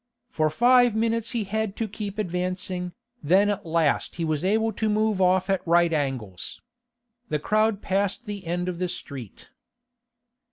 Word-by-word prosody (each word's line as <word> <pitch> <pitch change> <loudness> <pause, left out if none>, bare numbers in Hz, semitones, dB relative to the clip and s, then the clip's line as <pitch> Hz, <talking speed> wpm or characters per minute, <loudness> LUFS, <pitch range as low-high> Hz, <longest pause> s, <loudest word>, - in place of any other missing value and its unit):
For 155 -1 +1
five 245 +5 +4
minutes 230 0 0
he 230 -2 -1
had 210 0 -2
to 225 - -2
keep 205 0 -6
advancing, 180 -1 -3 0.3
then 190 +7 +4
at 195 -4 -4
last 160 -3 +1
he 170 - -2
was 155 -1 -1
able 220 +3 +1
to 215 +2 -1
move 215 -2 +1
off 185 0 +3
at 195 -1 +1
right 170 0 +4
angles. 130 - -2 0.7
The 150 - +1
crowd 215 +6 +1
passed 200 +5 0
the 200 -4 -6
end 175 +1 -1
of 180 -2 -3
the 180 - 0
street. 135 - -8
190 Hz, 160 wpm, -25 LUFS, 170-215 Hz, 0.7 s, five